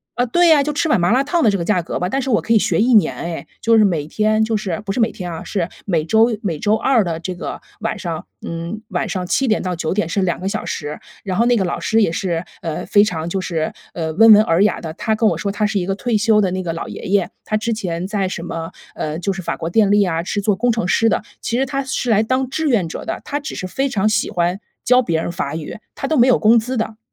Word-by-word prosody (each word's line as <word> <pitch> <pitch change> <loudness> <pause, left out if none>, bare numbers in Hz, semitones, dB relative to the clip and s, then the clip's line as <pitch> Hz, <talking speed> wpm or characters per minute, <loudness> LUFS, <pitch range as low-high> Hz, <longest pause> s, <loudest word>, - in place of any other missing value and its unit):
呃， 245 - +1
对 345 +8 +3
呀， 295 -3 +6
就 295 +1 -2
吃 320 - 0
碗 300 - +3
麻 175 +4 +2
辣 260 +3 +3
烫 335 +3 0
的 215 - +5
这 200 - -1
个 - - -1
价 185 0 +1
格 - - -4
吧， 180 +1 -1
但 270 - 0
是 265 - -2
我 215 - +3
可 - - -5
以 230 - +6
学 - - +1
1 240 0 +4
年 210 - +4
哎。 170 -1 -5 0.2
就 230 0 +4
是 215 - +6
每 155 -6 0
天 215 +3 +1
就 220 -1 0
是 200 -1 -3
不 195 - -3
是 245 - -2
每 225 0 +2
天 180 -3 -6
啊， 160 - -6
是 180 -4 -2 0.2
每 170 -6 +1
周 225 +5 +3
每 170 -8 -2
周 210 +7 +2
二 235 -1 +3
的 165 -3 -3
这 180 +1 -5
个 - - -6 0.2
晚 - - -2
上， 165 -2 -4 0.2
嗯， 170 +6 -5
晚 220 - -2
上 185 -1 -3
7 270 +8 +1
点 215 - +2
到 180 -1 -2
9 165 0 -2
点 190 -5 -1
是 195 +2 0
2 175 -2 -1
个 190 +2 -2
小 215 - -3
时。 150 0 -4 0.2
然 190 -2 -3
后 235 - +3
那 245 0 +4
个 200 - +1
老 175 - -2
师 225 0 +2
也 200 - +2
是， 170 -1 -2 0.2
呃， 160 -2 -3
非 205 - +5
常 170 -5 -2
就 190 - -1
是， 165 -4 -2 0.2
呃， 160 -2 -3
温 225 +4 +8
文 210 - +7
尔 170 -2 +3
雅 210 - +1
的。 160 - -5
他 220 - -1
跟 215 0 +3
我 - - -1
说 200 - -2
他 210 +1 0
是 215 - -2
一 180 - 0
个 195 - -1
退 225 +2 0
休 210 0 +3
的 190 - +1
那 185 +1 -3
个 165 -2 -3
老 165 - -5
爷 - - -8
爷， 195 -1 +1 0.2
他 215 - -1
之 230 +2 -1
前 185 -5 -3
在 200 -2 -1
什 185 - -5
么， 165 -1 -5 0.2
呃， 155 +2 -3
就 195 +2 -1
是 190 -2 -6
法 - - -2
国 165 - -4
电 205 +1 +3
力 205 0 +5
啊， 165 -3 -1
是 205 +3 -2
做 200 0 +1
工 245 +4 +1
程 220 -6 -1
师 225 +5 +3
的， - - +1 0.2
其 235 +2 -1
实 270 - +2
他 275 0 -2
是 260 -2 -2
来 215 0 +4
当 255 +2 0
志 315 +2 -1
愿 200 -9 +1
者 - - -6
的， - - -4
他 290 - -3
只 285 - -6
是 185 - -5
非 270 +8 -1
常 215 -3 +1
喜 215 0 0
欢 175 0 0 0.2
教 250 +1 +4
别 165 -7 0
人 175 - -3
法 160 -4 -3
语， 160 - -6 0.2
他 270 - -4
都 315 - +1
没 240 - +6
有 255 - +4
工 225 +2 +5
资 245 +4 -1
的。 220 -1 -3
205 Hz, 310 characters per minute, -19 LUFS, 175-225 Hz, 0.2 s, 温